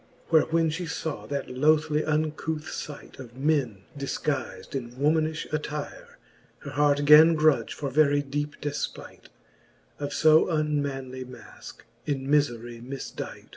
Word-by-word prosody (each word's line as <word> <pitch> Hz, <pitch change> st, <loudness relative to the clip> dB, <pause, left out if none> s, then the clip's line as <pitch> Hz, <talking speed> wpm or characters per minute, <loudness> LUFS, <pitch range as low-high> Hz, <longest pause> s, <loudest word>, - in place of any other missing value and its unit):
Where 160 Hz, -2 st, +6 dB
when 165 Hz, 0 st, +1 dB
fhe 165 Hz, +1 st, -4 dB
faw 160 Hz, -2 st, -4 dB
that 140 Hz, -1 st, -3 dB
lothly 150 Hz, +3 st, +2 dB
uncouth 155 Hz, 0 st, -2 dB
fight, 145 Hz, -4 st, -8 dB
Of 125 Hz, -1 st, -11 dB
men 135 Hz, -9 st, 0 dB
difguiz'd 140 Hz, +1 st, -3 dB
in 120 Hz, -3 st, -4 dB
womanifhe 155 Hz, +4 st, 0 dB
attire, 150 Hz, -1 st, -5 dB, 0.4 s
Her 145 Hz, -, -7 dB
heart 145 Hz, 0 st, +2 dB
gan 155 Hz, +3 st, +8 dB
grudge, 155 Hz, -1 st, +2 dB
for 140 Hz, -2 st, -4 dB
very 145 Hz, 0 st, +3 dB
deepe 145 Hz, +1 st, -4 dB
defpight 145 Hz, -1 st, -5 dB, 0.7 s
Of 145 Hz, 0 st, -3 dB
fo 155 Hz, +1 st, +5 dB
unmanly 140 Hz, -5 st, -2 dB
maske, 125 Hz, 0 st, -12 dB, 0.2 s
in 135 Hz, -2 st, -2 dB
mifery 120 Hz, -5 st, 0 dB
mifdight. 135 Hz, +2 st, -7 dB
145 Hz, 130 wpm, -26 LUFS, 135-155 Hz, 0.7 s, gan